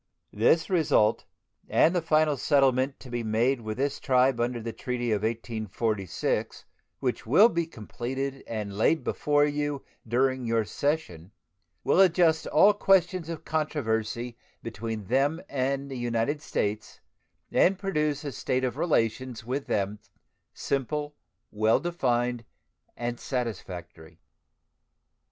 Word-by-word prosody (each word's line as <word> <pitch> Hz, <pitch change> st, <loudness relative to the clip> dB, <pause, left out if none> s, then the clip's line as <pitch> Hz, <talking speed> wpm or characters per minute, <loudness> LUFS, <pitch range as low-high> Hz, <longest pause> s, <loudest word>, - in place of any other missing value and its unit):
This 140 Hz, +10 st, +3 dB
result 155 Hz, -, +2 dB, 0.4 s
and 165 Hz, -, +4 dB
the 175 Hz, -, +2 dB
final 155 Hz, -2 st, +3 dB
settlement 135 Hz, -1 st, +2 dB
to 125 Hz, -, -11 dB
be 120 Hz, -1 st, -2 dB
made 115 Hz, +4 st, +1 dB
with 110 Hz, 0 st, -5 dB
this 140 Hz, +2 st, -1 dB
tribe 130 Hz, -1 st, +3 dB
under 120 Hz, 0 st, -1 dB
the 115 Hz, 0 st, -5 dB
treaty 120 Hz, +1 st, -3 dB
of 105 Hz, -2 st, +1 dB
1846, 110 Hz, -4 st, -2 dB, 0.3 s
which -, -, -2 dB
will 195 Hz, -, +7 dB
be 170 Hz, -4 st, -1 dB
completed 135 Hz, +1 st, -5 dB
and 105 Hz, -3 st, -4 dB
laid 135 Hz, +10 st, +2 dB
before 145 Hz, 0 st, +2 dB
you 145 Hz, -1 st, -2 dB, 0.2 s
during 130 Hz, +2 st, +1 dB
your 115 Hz, -2 st, +1 dB
session, 100 Hz, -, -2 dB, 0.5 s
will -, -, +3 dB
adjust 170 Hz, -3 st, +4 dB
all 200 Hz, +7 st, +6 dB
questions 185 Hz, -4 st, +2 dB
of 165 Hz, -2 st, -6 dB
controversy 120 Hz, -6 st, -2 dB, 0.2 s
between 110 Hz, -1 st, -5 dB
them 135 Hz, -, +1 dB
and 135 Hz, +1 st, -2 dB
the 130 Hz, -, -5 dB
United 120 Hz, +5 st, -1 dB
States 105 Hz, -6 st, -3 dB, 0.5 s
and 190 Hz, +1 st, +4 dB
produce 150 Hz, -7 st, -1 dB
a 145 Hz, -, -4 dB
state 130 Hz, 0 st, -1 dB
of 125 Hz, 0 st, -1 dB
relations 125 Hz, -6 st, 0 dB
with 135 Hz, +3 st, -3 dB
them 100 Hz, 0 st, -1 dB, 0.5 s
simple, 145 Hz, +2 st, -2 dB, 0.4 s
well 110 Hz, +1 st, +3 dB
defined, 125 Hz, -8 st, -1 dB, 0.5 s
and 120 Hz, 0 st, -3 dB
satisfactory. 90 Hz, -, -5 dB
130 Hz, 125 wpm, -27 LUFS, 115-150 Hz, 0.5 s, will